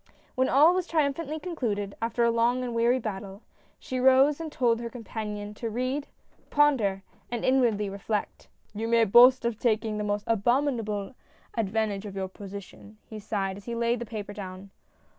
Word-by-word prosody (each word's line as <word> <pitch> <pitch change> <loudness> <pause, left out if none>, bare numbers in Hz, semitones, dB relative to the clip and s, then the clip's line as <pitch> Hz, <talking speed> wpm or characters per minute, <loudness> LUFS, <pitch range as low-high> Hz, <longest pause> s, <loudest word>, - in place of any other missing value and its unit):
When 260 -1 +1
all 305 +6 +6
was 365 -1 -1
triumphantly 310 0 -1
concluded 225 - -3
— - - -38
after 230 +1 0
a 235 - +4
long 235 +2 +1
and 245 -1 -4
weary 235 +2 +3
battle 200 -3 -6 0.2
— - - -34
she 255 - -4
rose 265 +3 +5
and 320 -2 -5
told 235 -4 +1
her 235 - -4
companion 210 -3 -6
to 230 +2 -5
read, 255 +5 -2 0.4
ponder 235 -10 +2 0.3
and 240 -1 -3
inwardly 235 -6 +2
reflect. 200 +2 -4
" - - -37
You 220 +2 -3
may 230 0 +4
boast 245 +4 +7
of 235 -2 -1
taking 220 -2 0
the - - -1
most 205 0 -1
abominable 230 -2 0 0.4
advantage 215 -1 -1
of 195 - -8
your 190 -1 -3
position," 200 +2 -10
he 220 - -8
sighed, 200 -2 -3
as 200 - -13
he 235 - -4
laid 235 +1 0
the 240 - -4
paper 205 -2 -6
down. 190 -1 -8
230 Hz, 180 wpm, -27 LUFS, 205-255 Hz, 0.4 s, boast